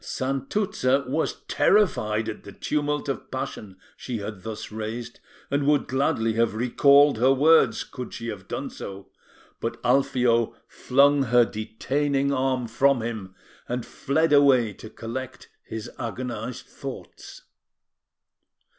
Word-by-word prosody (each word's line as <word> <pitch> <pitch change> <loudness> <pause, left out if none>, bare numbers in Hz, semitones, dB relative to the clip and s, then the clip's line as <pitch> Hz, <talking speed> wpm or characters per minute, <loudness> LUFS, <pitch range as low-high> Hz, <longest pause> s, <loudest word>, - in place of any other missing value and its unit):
Santuzza 135 0 -1
was 155 +5 -2
terrified 110 - +2
at - - -6
the 100 - -10
tumult 145 +6 -2
of 135 -5 -4
passion 95 -3 -6 0.2
she 125 -3 -5
had 105 -2 -6
thus 110 +1 -7
raised, 110 +2 -6 0.3
and 140 0 +1
would 150 -1 +3
gladly 120 -4 +1
have 115 -1 +1
recalled 140 +3 +5
her 130 +3 +5
words, 155 +5 +4
could 125 -2 -8
she 115 - -6
have 100 -3 -7
done - - -4
so; 100 0 -9 0.5
but - - -4
Alfio 125 -4 +2
flung 140 +2 +3
her 120 0 +5
detaining 135 +6 -1
arm 130 -2 0
from 135 +1 +2
him, 105 -5 -5 0.3
and 125 -1 -2
fled 155 +3 0
away 130 -7 +5
to 110 - -11
collect 130 +4 -7
his 110 -1 -7
agonised 120 0 -5
thoughts. - - -9
125 Hz, 130 wpm, -25 LUFS, 110-140 Hz, 0.5 s, recalled